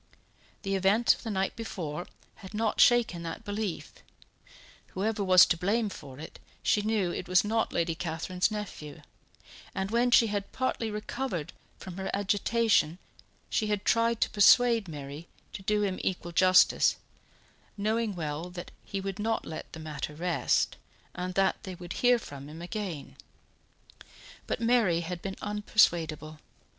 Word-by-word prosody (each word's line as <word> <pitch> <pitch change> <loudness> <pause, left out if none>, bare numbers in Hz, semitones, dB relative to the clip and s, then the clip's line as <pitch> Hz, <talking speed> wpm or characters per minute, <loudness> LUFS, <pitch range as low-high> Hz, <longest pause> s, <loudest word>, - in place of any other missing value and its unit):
The 195 -1 -2
event 195 +5 +4
of - - -11
the 225 - -5
night 195 -2 -1
before 175 -7 -5 0.3
had 195 0 -10
not 220 0 +1
shaken 240 -8 +4
that 170 +7 -6
belief; 205 -3 -4 1.0
whoever 205 +2 -1
was 185 -1 +8
to 170 - 0
blame 210 +5 0
for 135 -8 -10
it, 155 - -10 0.2
she 210 - +3
knew 205 -4 0
it - - -5
was 185 0 +4
not 225 +2 0
Lady 170 -1 0
Catherine's 175 +3 -1
nephew; 205 -9 -7 0.7
and 190 +1 -2
when 240 +2 +3
she 235 - +6
had 205 -2 -3
partly 250 -3 -1
recovered 210 - -4 0.2
from 185 -1 -9
her 190 0 -3
agitation 205 -3 +2 0.5
she 215 - 0
had 205 -1 -1
tried 230 0 +2
to - - +3
persuade 230 +1 +5
Mary 145 +1 -8 0.3
to - - -7
do 210 +1 +1
him 190 -2 -1
equal 175 -2 -3
justice, 185 +2 +5 0.8
knowing 215 0 0
well 160 +1 -4
that 180 0 -8
he 200 - -4
would 195 +1 -5
not 225 +2 -1
let 160 - -7
the 160 - -9
matter 150 -1 -5
rest 175 +1 0 0.4
and 180 0 -4
that 195 -1 +2
they 185 -1 -7
would 175 0 -7
hear 245 0 +5
from 140 -9 -9
him 155 +2 -9
again. 175 -3 -6 1.3
But - - -2
Mary 225 -8 +3
had 175 +1 -5
been 195 -1 -5
unpersuadable. 170 -7 +1
190 Hz, 150 wpm, -29 LUFS, 170-215 Hz, 1.3 s, was